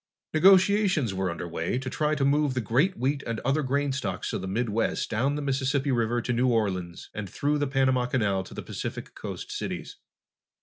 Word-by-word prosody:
Negotiations 185 Hz, -, +5 dB
were 95 Hz, -1 st, -1 dB
under 85 Hz, 0 st, -4 dB
way 85 Hz, +6 st, -2 dB
to 130 Hz, +1 st, -5 dB
try 150 Hz, +3 st, 0 dB
to 140 Hz, -2 st, +1 dB
move 145 Hz, -1 st, +2 dB
the -, -, +1 dB
great 135 Hz, -, +1 dB
wheat 140 Hz, +3 st, 0 dB
and 115 Hz, -1 st, -2 dB
other 135 Hz, +4 st, +1 dB
grain 140 Hz, +1 st, 0 dB
stocks 100 Hz, -9 st, -3 dB
of -, -, -2 dB
the 95 Hz, -, -4 dB
Midwest 110 Hz, +2 st, -1 dB
down 130 Hz, +6 st, +1 dB
the 150 Hz, -, -3 dB
Mississippi 135 Hz, 0 st, 0 dB
River 120 Hz, -1 st, +1 dB
to 125 Hz, -, -1 dB
New 125 Hz, +2 st, +2 dB
Orleans 95 Hz, -7 st, -1 dB
and 105 Hz, -3 st, -5 dB
through 145 Hz, +8 st, 0 dB
the 145 Hz, -, +1 dB
Panama 130 Hz, -2 st, +2 dB
Canal 100 Hz, -7 st, +1 dB
to -, -, -11 dB
the -, -, -5 dB
Pacific -, -, -6 dB
Coast -, -, -7 dB
cities. -, -, -5 dB
130 Hz, 200 wpm, -27 LUFS, 110-145 Hz, -, Negotiations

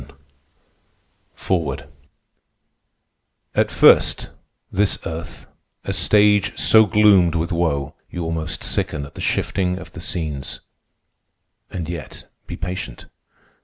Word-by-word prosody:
THE 70 Hz, +3 st, -22 dB
TERRORISTS 80 Hz, -8 st, -1 dB, 1.7 s
"At -, -, +2 dB
first, -, -, +4 dB, 0.4 s
this 100 Hz, +1 st, +1 dB
Earth, 80 Hz, +1 st, -7 dB, 0.4 s
a -, -, -2 dB
stage 105 Hz, -1 st, +3 dB
so 110 Hz, -1 st, +6 dB
gloomed 100 Hz, -6 st, +4 dB
with 85 Hz, +1 st, -1 dB
woe 75 Hz, -4 st, -1 dB, 0.2 s
You 90 Hz, -, -5 dB
almost 80 Hz, -1 st, -3 dB
sicken 70 Hz, -, -1 dB
at 70 Hz, -, -13 dB
the -, -, -9 dB
shifting 90 Hz, -2 st, -1 dB
of -, -, -10 dB
the 85 Hz, -, -9 dB
scenes. 75 Hz, -6 st, -4 dB, 1.1 s
And 85 Hz, -4 st, -5 dB
yet 85 Hz, -4 st, -8 dB, 0.2 s
be -, -, -6 dB
patient. 90 Hz, -7 st, -6 dB
85 Hz, 110 wpm, -21 LUFS, 75-95 Hz, 1.7 s, so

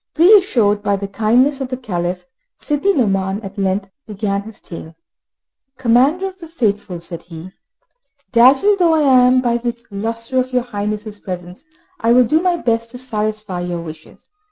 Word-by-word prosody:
Reassured 320 Hz, -, +4 dB
by 200 Hz, -, +1 dB
the 200 Hz, 0 st, -4 dB
kindness 245 Hz, +7 st, +2 dB
of 265 Hz, -, -3 dB
the 255 Hz, -, -3 dB
Caliph, 180 Hz, -6 st, -4 dB, 0.3 s
Sidi 300 Hz, +7 st, 0 dB
Nouman 195 Hz, -, 0 dB
at 195 Hz, +1 st, -8 dB
length 195 Hz, 0 st, -1 dB, 0.2 s
began 200 Hz, -1 st, -2 dB
his 215 Hz, 0 st, -12 dB
tale. 165 Hz, -1 st, -10 dB, 0.8 s
"Commander 260 Hz, +9 st, +2 dB
of 380 Hz, 0 st, -10 dB
the 335 Hz, -, -10 dB
Faithful," 210 Hz, -, -2 dB
said 170 Hz, 0 st, -8 dB
he, 170 Hz, +1 st, -11 dB, 0.8 s
"dazzled 270 Hz, -, +5 dB
though 335 Hz, -2 st, +4 dB
I 315 Hz, -, +2 dB
am 255 Hz, -2 st, +5 dB
by 240 Hz, -1 st, +1 dB
the 240 Hz, 0 st, -3 dB
lustre 230 Hz, +5 st, -2 dB
of 255 Hz, 0 st, -2 dB
your 250 Hz, -1 st, +2 dB
Highness' 210 Hz, -2 st, -5 dB
presence, 180 Hz, -, -8 dB, 0.3 s
I 230 Hz, -5 st, +3 dB
will 250 Hz, +1 st, +6 dB
do 310 Hz, +8 st, +2 dB
my 360 Hz, -1 st, +1 dB
best 230 Hz, -5 st, -1 dB
to 250 Hz, -, -8 dB
satisfy 215 Hz, -5 st, -3 dB
your 175 Hz, -1 st, -4 dB
wishes. 160 Hz, -1 st, -12 dB
230 Hz, 165 wpm, -18 LUFS, 195-260 Hz, 0.8 s, will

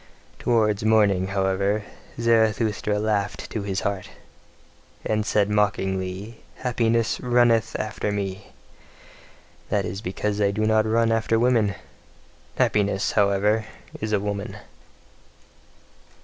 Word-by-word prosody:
Towards 110 Hz, -3 st, +1 dB
morning, 105 Hz, -4 st, +3 dB
however, 100 Hz, +2 st, 0 dB, 0.4 s
Zarathustra 110 Hz, -2 st, +2 dB
laughed 105 Hz, -1 st, -2 dB
to 110 Hz, -, -3 dB
his 100 Hz, -1 st, -2 dB
heart, 100 Hz, -2 st, -3 dB, 1.0 s
and 110 Hz, 0 st, 0 dB
said 105 Hz, -1 st, +2 dB
mockingly: 100 Hz, 0 st, -1 dB, 0.2 s
"Happiness 115 Hz, -2 st, 0 dB
runneth 120 Hz, -2 st, +2 dB
after 110 Hz, -1 st, -2 dB
me. 100 Hz, -1 st, -4 dB, 1.2 s
That -, -, 0 dB
is 95 Hz, +3 st, -5 dB
because 105 Hz, +2 st, -2 dB
I 100 Hz, -, +3 dB
do 105 Hz, +2 st, -1 dB
not 110 Hz, 0 st, +3 dB
run 115 Hz, +1 st, +2 dB
after 115 Hz, 0 st, +1 dB
women. 115 Hz, -4 st, +2 dB, 0.8 s
Happiness, 100 Hz, -1 st, +1 dB
however, 105 Hz, +2 st, +2 dB, 0.3 s
is 110 Hz, 0 st, -3 dB
a 105 Hz, -, +2 dB
woman." 100 Hz, 0 st, -4 dB
105 Hz, 105 wpm, -24 LUFS, 100-110 Hz, 1.2 s, morning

